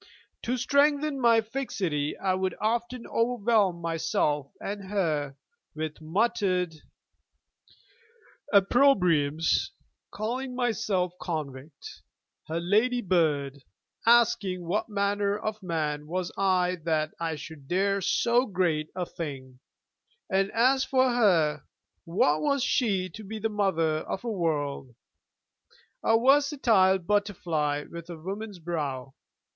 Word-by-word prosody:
To 250 +2 -1
strengthen 285 +2 +2
my 230 -2 +5
fixity 195 - -3
I 190 -1 0
would 185 -1 -1
often 235 +3 -2
overwhelm 225 -6 +1
myself, 160 -3 0
and 200 -1 -6
her, 155 -9 -1 0.4
with 155 0 -5
muttered 185 0 0 1.8
opprobriums, 180 - +3 0.4
calling 250 +4 -4
myself 215 -7 0
'convict,' 145 -3 -6 0.5
her 160 +1 -2
'lady 220 +8 +2
bird'; 145 -6 +1 0.5
asking 225 -6 +3
what 200 +6 -1
manner 200 0 0
of 215 0 -4
man 150 -4 -2
was 180 +2 -3
I 185 -2 +1
that 155 -2 0
I 165 -1 -2
should 145 -1 -10
dare 195 +3 +1
so 240 +7 +2
great 170 -6 0
a 180 -1 -2
thing; 135 -7 -7 0.7
and 195 +1 +2
as 260 +3 +3
for 260 -1 +2
her, 165 - +2 0.4
what 155 -3 +2
was 280 -3 +1
she 205 -9 +1
to 215 - -10
be 215 +2 -6
the 220 +1 -1
Mother 190 -7 +1
of 190 - -5
a 235 - -2
world? 145 - -2 1.1
a 225 - +4
versatile 255 -8 +4
butterfly 170 -7 -1
with 170 0 -9
a 170 - -7
woman's 200 +5 -6
brow! 145 -6 -4
185 Hz, 115 wpm, -27 LUFS, 160-225 Hz, 1.8 s, my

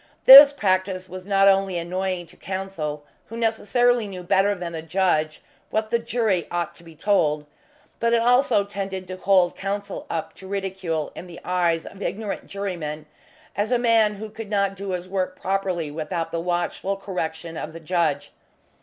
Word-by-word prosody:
This 280 +2 +12
practice 185 -6 0
was 185 +1 -9
not 195 -1 +4
only 195 -2 +3
annoying 180 +1 -2
to 170 - -19
Counsel, 185 -6 -5 0.2
who 230 - -8
necessarily 235 +1 +1
knew 185 -2 -7
better 195 +3 +2
than 175 -2 -5
the 165 -1 -5
judge 160 -2 0 0.3
what 220 0 -2
the 235 - +2
jury 230 -6 0
ought 175 0 -3
to - - -15
be 165 -1 -14
told, 155 -5 +1 0.5
but 230 0 +1
it 235 - +4
also 245 -2 +3
tended 195 -2 -5
to 185 0 -6
hold 185 -2 +3
Counsel 200 0 -4
up 165 -1 -3
to 190 - -12
ridicule 190 -5 -3
in 180 - -9
the 170 -1 -10
eyes 175 -2 +1
of 195 - -11
ignorant 205 0 -4
jurymen 170 -7 -5 0.5
as 205 +4 -1
a 250 - +4
man 225 -3 +3
who 215 +1 -8
could 220 -1 -8
not 200 -2 +1
do 195 0 -6
his 180 0 -4
work 185 -1 -3
properly 185 -5 -1
without 165 +2 -4
the 165 - -2
watchful 175 +3 -2
correction 165 -4 -5
of 155 - -5
the 165 - -9
judge. 160 -4 -1
190 Hz, 175 wpm, -23 LUFS, 170-200 Hz, 0.5 s, This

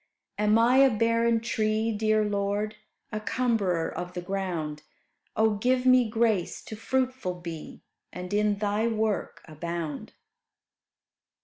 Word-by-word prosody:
Am 210 +1 +4
I 240 +3 +4
a 270 0 +7
barren 230 0 +2
tree, 220 0 0
dear 215 0 +2
Lord? 205 +1 -1 0.4
A 215 - -2
cumberer 215 -8 0
of 180 0 -5
the 180 - -3
ground. 175 -6 -3 0.5
Oh! 220 0 +3
give 250 +4 +1
me 255 -3 +5
grace 220 -5 0
to 220 - -8
fruitful 255 -4 -1
be, 170 -3 -8 0.3
And 180 +2 -6
in 210 0 +2
Thy 210 +2 0
work 220 -2 -1
abound. 160 -1 -5
215 Hz, 125 wpm, -27 LUFS, 180-230 Hz, 0.5 s, a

